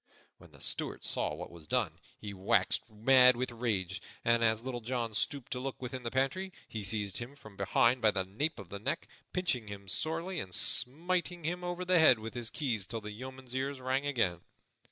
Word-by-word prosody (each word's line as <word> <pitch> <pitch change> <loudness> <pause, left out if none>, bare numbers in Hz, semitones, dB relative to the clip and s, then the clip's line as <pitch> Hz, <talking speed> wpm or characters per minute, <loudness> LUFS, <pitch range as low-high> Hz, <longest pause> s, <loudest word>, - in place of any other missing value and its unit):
When - - -16
the - - -16
Steward - - -1
saw 75 - -1
what 90 +3 -7
was 85 -3 -9
done, - - 0 0.2
he 105 -1 -6
waxed 95 +4 +2
mad 125 +4 +6
with 125 +1 -2
rage; 100 -6 -1 0.2
and, 115 0 +4
as 110 0 +2
Little 125 -2 -4
John 115 -1 -2
stooped 130 +4 -1
to 125 - -1
look 135 +1 -4
within 130 0 -5
the 120 - -3
pantry, 135 +10 0 0.2
he 110 -2 -5
seized 100 0 0
him 120 +4 -6
from 110 -7 -14
behind 115 +6 +3
by 110 - +6
the 95 -2 0
nape 140 +12 -2
of 100 -5 -9
the 100 - -6
neck, - - -2 0.2
pinching 160 -12 0
him 100 -1 -8
sorely 165 - -1
and 90 -1 -3
smiting 175 +6 +2
him 175 +3 -2
over 175 +1 -3
the 180 -1 +4
head 145 -6 +7
with 110 +1 -7
his 120 -2 -2
keys 115 - -1
till 115 +2 -4
the 105 0 -6
yeoman's 130 +3 -8
ears 135 +1 -2
rang 130 +2 0
again. 95 - +1
120 Hz, 205 wpm, -32 LUFS, 105-135 Hz, 0.2 s, head